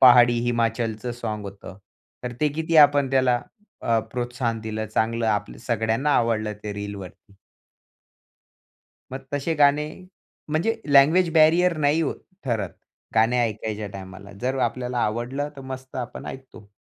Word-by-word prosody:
पहाडी 120 -2 +7
हिमाचलचं 115 0 -1
साँग 110 -3 -4
होतं. 100 -1 -9 0.5
तर 125 - -4
ते 150 - +3
किती 160 +2 -1
आपण 145 -2 0
त्याला 130 -2 +3 0.4
अ, 115 -1 +2
प्रोत्साहन 120 -2 -2
दिलं, 110 0 -4
चांगलं 115 +2 0
आपलं 105 -1 -1
सगळ्यांना 115 +5 +1
आवडलं 110 -2 +1
ते 105 -1 -4
रीलवरती. 100 0 -8 1.8
मग 135 +1 -5
तसे 145 +3 -1
गाणे 145 0 +4 0.6
म्हणजे 170 +10 +1
लँग्वेज 155 +6 +5
बॅरियर 165 +2 +5
नाही 150 +2 +2
ओ 150 - 0 0.3
ठरत. 110 -8 -1 0.4
गाणे 115 +3 +3
ऐकायच्या 110 -1 -3
टायमाला 95 +1 -10
जर 130 +2 -1
आपल्याला 125 +1 -4
आवडलं 120 +7 -2
तर 135 - -8
मस्त 130 0 -8
आपण 125 -1 -6
ऐकतो. 130 -6 -10
120 Hz, 130 wpm, -24 LUFS, 110-140 Hz, 1.8 s, पहाडी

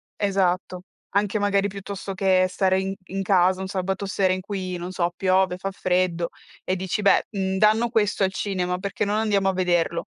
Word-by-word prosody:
esatto. 185 -2 0 0.3
Anche 205 +1 0
magari 200 -1 +2
piuttosto 195 0 -6
che 185 -1 +3
stare 190 +1 +1
in 190 0 -2
in 195 +1 -3
casa, 185 -1 +3
un 190 - -4
sabato 195 +1 -2
sera 195 -1 +1
in 185 - 0
cui, 185 -2 -4
non 175 +1 -6
so, 175 -2 -1
piove, 185 0 +1
fa 195 +1 -4
freddo 180 -2 0 0.3
e 185 - -1
dici: 190 +3 -2
"Beh, 200 - +4
mhmm, 190 -2 -1
danno 215 +4 +3
questo 210 -3 +1
al 190 - +2
cinema, 185 -2 -2
perché 200 +2 -3
non 205 0 0
andiamo 205 -3 +2
a - - 0
vederlo?" 175 -2 0
190 Hz, 190 wpm, -24 LUFS, 185-200 Hz, 0.3 s, Beh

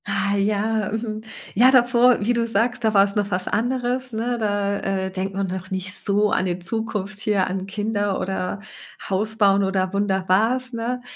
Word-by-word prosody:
Ah 200 0 0
ja, 210 +1 0
mhm. 215 -1 -4 0.3
Ja 245 +6 +6
davor, 245 -1 +5
wie 245 - +2
du 235 -1 0
sagst, 235 +3 0
da 220 -1 +1
war's 200 0 +4
noch 205 -1 0
was 185 -1 -1
anderes, 250 +2 -1
ne? 235 +2 -2
Da, 205 -2 0
äh, 190 -1 -2
denkt 190 +1 -4
man 195 0 -1
noch 185 0 -5
nicht 190 0 -4
so 205 +1 +2
an 185 - +1
die 175 -1 -1
Zukunft 210 +1 -4
hier, 205 -3 +1
an 190 +1 -4
Kinder 205 0 -1
oder 190 +1 -3 0.5
Haus 210 +3 -1
bauen 200 -2 +4
oder 190 -1 -1
Wunderbares, 205 +6 +1
ne? 235 +2 -3
205 Hz, 175 wpm, -22 LUFS, 195-225 Hz, 0.5 s, Ja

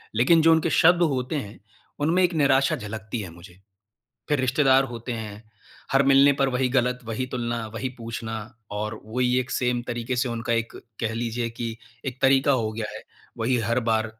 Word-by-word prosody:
लेकिन 160 +8 +5
जो 165 +1 +5
उनके 160 +1 +3
शब्द 175 +1 +5
होते 130 +4 -2
हैं, 110 -7 -5 0.4
उनमें 165 +5 +2
एक 175 -1 +2
निराशा 135 -1 +3
झलकती 110 +2 -6
है 95 - -7
मुझे। 90 +1 -15 0.7
फिर 145 -3 +2
रिश्तेदार 135 +1 +4
होते 120 +2 -5
हैं, 110 -2 -6 0.5
हर 135 0 +5
मिलने 140 +1 +6
पर 135 -1 +1
वही 125 0 0
गलत, 125 -1 +1
वही 115 +3 -3
तुलना, 120 -2 -2
वही 130 +3 -2
पूछना 115 -1 -5 0.4
और 105 +1 -4
वही 125 +3 +1
एक 130 0 -3
सेम 125 -1 0
तरीके 120 +1 -3
से 125 +1 0
उनका 115 0 -2
एक 115 0 -1 0.3
कह 115 -1 -1
लीजिए 115 0 -2
कि 115 -1 -5 0.3
एक 130 0 -5
तरीका 135 +1 +4
हो 115 -4 0
गया 110 0 -4
है, - - -8 0.4
वही 125 +3 +1
हर 115 +2 0
बार 110 0 +2
125 Hz, 185 wpm, -25 LUFS, 115-135 Hz, 0.7 s, मिलने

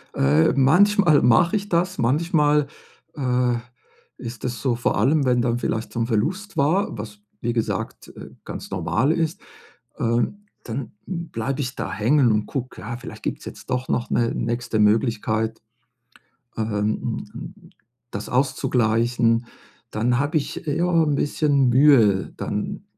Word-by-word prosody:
Äh, 75 +4 +3
manchmal 175 +3 +5
mache 170 - +4
ich 205 0 -2
das, 180 +2 0
manchmal, 150 +2 +2 0.5
äh, 125 -3 +1 0.6
ist 115 -2 -8
das 125 -1 -3
so, 130 -3 +1
vor 120 - 0
allem, 145 +1 +3
wenn 125 -1 +3
dann 120 0 0
vielleicht 110 -1 -2
so 120 - -3
'n 115 - 0
Verlust 180 - -1
war, 160 - +1
was 105 0 -8 0.2
wie 120 0 -1
gesagt, 115 -2 -3
äh, - - -10 0.2
ganz - - -7
normal 135 +8 +1
ist, 165 +4 -1 0.6
ähm, 120 - -1 0.2
dann 120 0 -5
bleibe 145 -7 -4
ich 130 0 -3
da - - -4
hängen 120 +2 +3
und 105 0 0
gucke, 130 -2 -5
ja, 120 +2 -5
vielleicht 120 - -10
gibt's - - -4
jetzt - - -10
doch 125 +1 -1
noch 120 - -1
'ne 115 -1 +1
nächste 120 -1 -2
Möglichkeit, 110 0 +1 1.0
ähm, 110 - -1
hm, 105 0 -2
hm, - - -10 0.4
das 100 +1 -5
auszugleichen, 120 -2 +1 0.4
dann 120 +3 0
habe 145 +3 +1
ich, 145 - -3
ja, 165 +3 0 0.2
'n 150 -2 +1
bisschen 140 -2 +2
Mühe, 120 -8 +4
dann - - -4
125 Hz, 145 wpm, -23 LUFS, 115-150 Hz, 1.0 s, manchmal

